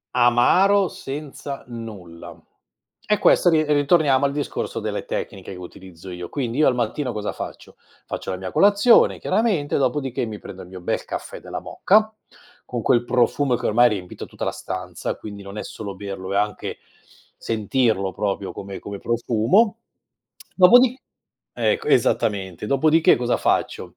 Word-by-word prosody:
Amaro, 175 Hz, +12 st, +4 dB
senza 140 Hz, 0 st, -7 dB
nulla. 105 Hz, -8 st, -9 dB, 0.7 s
E 210 Hz, -, +4 dB
questo 180 Hz, -, +4 dB
ri 160 Hz, -2 st, +4 dB
uhm, 145 Hz, -1 st, +2 dB
torniamo 145 Hz, -5 st, +4 dB
al 140 Hz, -, +1 dB
discorso 145 Hz, 0 st, -3 dB
delle -, -, -3 dB
tecniche 95 Hz, -1 st, -5 dB
che -, -, -9 dB
utilizzo 90 Hz, 0 st, -11 dB
io. 90 Hz, 0 st, -7 dB
Quindi 130 Hz, -1 st, -3 dB
io 155 Hz, -, +5 dB
al 125 Hz, -, +2 dB
mattino 125 Hz, +3 st, -2 dB
cosa 105 Hz, -1 st, -3 dB
faccio? -, -, -9 dB, 0.3 s
Faccio -, -, -6 dB
la 95 Hz, -, -1 dB
mia 95 Hz, 0 st, -6 dB
colazione 205 Hz, +4 st, +5 dB
chiaramente, 200 Hz, -11 st, 0 dB
dopodiché 135 Hz, -2 st, -1 dB
mi 110 Hz, -2 st, -6 dB
prendo 95 Hz, -, -10 dB
il -, -, -11 dB
mio 90 Hz, 0 st, -10 dB
bel -, -, -2 dB
caffè -, -, -6 dB
della -, -, -6 dB
moka, 215 Hz, +2 st, +2 dB, 0.5 s
con 120 Hz, -2 st, -4 dB
quel 120 Hz, -1 st, +3 dB
profumo 125 Hz, +2 st, +1 dB
che -, -, -5 dB
ormai 120 Hz, +3 st, +4 dB
ha -, -, +8 dB
riempito 95 Hz, -5 st, -6 dB
tutta -, -, -6 dB
la -, -, 0 dB
stanza, 90 Hz, -2 st, -5 dB
quindi 100 Hz, -1 st, -9 dB
non 100 Hz, +1 st, -9 dB
è -, -, -4 dB
solo 100 Hz, -3 st, -7 dB
berlo, 95 Hz, -1 st, -6 dB
è 100 Hz, -, +1 dB
anche 105 Hz, 0 st, -2 dB, 0.6 s
sentirlo 110 Hz, -3 st, 0 dB
proprio 100 Hz, 0 st, -2 dB
come 100 Hz, 0 st, -8 dB
come 100 Hz, -1 st, -7 dB
profumo, 120 Hz, -, +2 dB, 0.8 s
dopodi 245 Hz, +7 st, +6 dB, 0.5 s
ecco 450 Hz, -2 st, 0 dB
esattamente, 95 Hz, -2 st, +1 dB
dopodiché 155 Hz, +7 st, +4 dB
cosa 120 Hz, 0 st, 0 dB
faccio? -, -, -1 dB
120 Hz, 160 wpm, -22 LUFS, 100-150 Hz, 0.8 s, ha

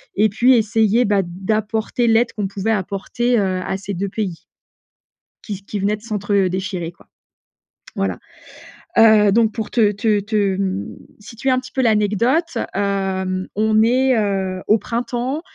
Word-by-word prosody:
Et 215 Hz, +2 st, +3 dB
puis 240 Hz, +6 st, +4 dB
essayer, 225 Hz, +1 st, +2 dB
bah, 200 Hz, -1 st, +2 dB
d'apporter 215 Hz, +6 st, -1 dB
l'aide 230 Hz, +1 st, +3 dB
qu'on 205 Hz, -2 st, -2 dB
pouvait 200 Hz, +3 st, -2 dB
apporter, 215 Hz, +5 st, -1 dB
heu, 185 Hz, -2 st, -1 dB
à 190 Hz, -, -2 dB
ces 200 Hz, +1 st, -6 dB
2 195 Hz, +2 st, -3 dB
pays 190 Hz, -6 st, -4 dB, 1.0 s
qui 200 Hz, -2 st, -7 dB
qui 205 Hz, -, -5 dB
venaient 205 Hz, +2 st, 0 dB
de 210 Hz, -, -19 dB
s'entre, 210 Hz, -3 st, -3 dB
heu, 195 Hz, -2 st, +3 dB
déchirer, 185 Hz, -2 st, -4 dB
quoi. -, -, -23 dB, 0.9 s
Voilà. 95 Hz, -2 st, -2 dB, 0.8 s
Heu, 215 Hz, -2 st, +6 dB
donc 220 Hz, 0 st, +3 dB
pour 220 Hz, -2 st, -5 dB
te 215 Hz, -4 st, +3 dB
te 210 Hz, +1 st, +1 dB
te, 215 Hz, +2 st, -5 dB, 0.2 s
hem, 195 Hz, 0 st, -2 dB, 0.3 s
situer 230 Hz, +5 st, -3 dB
un 255 Hz, -, +2 dB
petit 255 Hz, 0 st, -11 dB
peu 265 Hz, -, -1 dB
l'anecdote, 230 Hz, -, +1 dB, 0.2 s
hem, 190 Hz, -2 st, -1 dB
on 215 Hz, 0 st, +3 dB
est, 255 Hz, +2 st, +3 dB
heu, 190 Hz, -3 st, -1 dB
au 215 Hz, -, +5 dB
printemps, 245 Hz, +6 st, -3 dB
210 Hz, 160 wpm, -19 LUFS, 195-230 Hz, 1.0 s, Heu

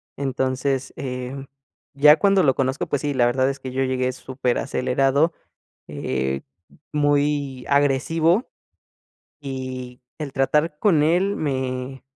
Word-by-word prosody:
Entonces, 130 Hz, 0 st, -1 dB
eh, 125 Hz, -1 st, -5 dB, 0.6 s
ya 150 Hz, +2 st, +7 dB
cuando 195 Hz, -2 st, +3 dB
lo 135 Hz, -3 st, +3 dB
conozco, 130 Hz, 0 st, -1 dB
pues 145 Hz, -, -1 dB
sí, 145 Hz, -1 st, -1 dB
la 125 Hz, -3 st, +3 dB
verdad 130 Hz, +2 st, +2 dB
es 140 Hz, 0 st, -4 dB
que 130 Hz, -, -7 dB
yo 135 Hz, +1 st, 0 dB
llegué 130 Hz, -1 st, 0 dB
súper 130 Hz, -1 st, -2 dB
acelerado, 135 Hz, +5 st, +1 dB, 0.5 s
eh, 65 Hz, +1 st, -2 dB, 0.5 s
muy 145 Hz, -3 st, +1 dB
agresivo, 155 Hz, -, +2 dB, 0.9 s
y 130 Hz, -2 st, -6 dB, 0.2 s
el 145 Hz, -3 st, -5 dB
tratar 150 Hz, +3 st, +1 dB
con 170 Hz, -7 st, +3 dB
él 180 Hz, +6 st, +2 dB
me 130 Hz, -2 st, -3 dB
135 Hz, 125 wpm, -23 LUFS, 130-150 Hz, 0.9 s, ya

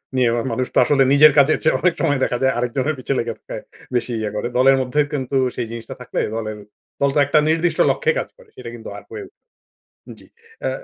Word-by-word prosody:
নিয়ে 125 Hz, -2 st, +3 dB
আবার 120 Hz, 0 st, -1 dB
মানুষ 130 Hz, +2 st, -1 dB
তো -, -, -2 dB
আসলে 140 Hz, -2 st, +3 dB
নিজের 150 Hz, +1 st, +7 dB
কাজের 145 Hz, +2 st, +5 dB
চেয়ে 155 Hz, -, +3 dB
অনেক 180 Hz, -2 st, +2 dB
সময় 145 Hz, -5 st, +1 dB
দেখা 125 Hz, -, 0 dB
যায় 130 Hz, -, +3 dB
আরেকজনের 130 Hz, +5 st, -1 dB
পিছে 135 Hz, -, -2 dB
লেগে 115 Hz, 0 st, -2 dB
থাকায় -, -, -8 dB, 0.3 s
বেশি 120 Hz, 0 st, -1 dB
ইয়ে 110 Hz, -1 st, -2 dB
করে। 105 Hz, -, -2 dB
দলের 135 Hz, +1 st, +5 dB
মধ্যে 130 Hz, +4 st, -2 dB
কিন্তু 135 Hz, -1 st, -3 dB, 0.2 s
সেই 120 Hz, -2 st, -3 dB
জিনিসটা 115 Hz, -1 st, -8 dB
থাকলে -, -, -4 dB, 0.2 s
দলের 110 Hz, -1 st, -4 dB, 0.4 s
দল 140 Hz, -, +3 dB
তো -, -, +3 dB
একটা 145 Hz, +2 st, +3 dB
নির্দিষ্ট 165 Hz, +2 st, 0 dB
লক্ষ্যে 470 Hz, -1 st, +1 dB
কাজ -, -, -4 dB
করে। -, -, -20 dB
সেটা 125 Hz, -2 st, -8 dB
কিন্তু 115 Hz, -, -9 dB
আর -, -, -11 dB
হয়ে 425 Hz, -2 st, -6 dB
উঠে -, -, -27 dB, 0.8 s
জি। -, -, -17 dB, 0.4 s
এ্যা -, -, 0 dB
135 Hz, 220 wpm, -20 LUFS, 120-150 Hz, 0.8 s, নিজের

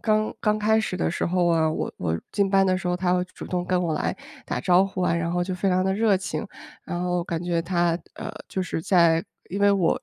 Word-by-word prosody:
刚 215 Hz, -1 st, +1 dB
刚 210 Hz, -1 st, +1 dB
开 220 Hz, +1 st, +3 dB
始 185 Hz, -4 st, -3 dB
的 -, -, 0 dB
时 175 Hz, -, -2 dB
候 175 Hz, 0 st, +1 dB
啊， 160 Hz, -2 st, +3 dB
我 155 Hz, -, -3 dB
我 80 Hz, -1 st, -1 dB
进 200 Hz, -1 st, +1 dB
班 195 Hz, -1 st, +4 dB
的 185 Hz, -1 st, +2 dB
时 185 Hz, -1 st, -3 dB
候， 180 Hz, -, +1 dB
她 180 Hz, 0 st, +1 dB
会 180 Hz, -, +1 dB
主 185 Hz, -, -10 dB
动 180 Hz, -1 st, -2 dB
跟 180 Hz, 0 st, +1 dB
我 165 Hz, -3 st, 0 dB
来 -, -, -1 dB, 0.3 s
打 -, -, -3 dB
招 180 Hz, +7 st, +4 dB
呼 195 Hz, -1 st, -4 dB
啊， 175 Hz, -, +2 dB
然 170 Hz, 0 st, -1 dB
后 175 Hz, 0 st, 0 dB
就 185 Hz, 0 st, -3 dB
非 190 Hz, +2 st, 0 dB
常 185 Hz, 0 st, +2 dB
地 190 Hz, 0 st, +1 dB
热 210 Hz, -1 st, +3 dB
情。 185 Hz, +3 st, -4 dB, 0.4 s
然 175 Hz, -, -4 dB
后 180 Hz, -1 st, 0 dB
感 170 Hz, -1 st, -3 dB
觉 170 Hz, -1 st, 0 dB
她， 175 Hz, -1 st, +1 dB, 0.2 s
呃， -, -, -6 dB, 0.2 s
就 190 Hz, -, -3 dB
是 165 Hz, -, -3 dB
在 170 Hz, -2 st, +4 dB, 0.2 s
因 195 Hz, +3 st, -4 dB
为 200 Hz, 0 st, +5 dB
我 190 Hz, -4 st, +2 dB
180 Hz, 275 characters per minute, -25 LUFS, 170-195 Hz, 0.4 s, 为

